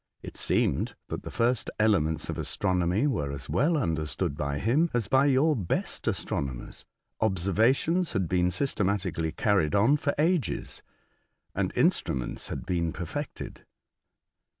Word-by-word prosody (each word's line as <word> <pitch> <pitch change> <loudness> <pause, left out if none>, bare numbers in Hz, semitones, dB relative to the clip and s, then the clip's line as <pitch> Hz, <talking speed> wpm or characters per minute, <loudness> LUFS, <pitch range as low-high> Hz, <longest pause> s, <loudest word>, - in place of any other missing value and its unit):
It - - -8
seemed - - 0
that - - -4
the - - -8
first 120 +1 0
elements 95 -8 +2
of - - -4
astronomy 90 +6 +1
were 75 - 0
as 70 -2 -5
well 145 - +2
understood 80 - -1
by 70 -1 -2
him, 135 - +2
as 115 -4 0
by 135 +5 +4
your 145 +3 +3
best 95 -9 -2
astronomers. 65 -3 -3 0.3
Observations 110 - +2
had 95 -5 0
been 90 0 +2
systematically 95 - 0
carried 95 -5 +1
on 115 +9 +4
for 145 -1 -1
ages, 165 0 0 0.7
and - - -1
instruments 65 -2 0
had - - -5
been 85 -2 0
perfected. 95 - -6
100 Hz, 130 wpm, -28 LUFS, 80-135 Hz, 0.7 s, by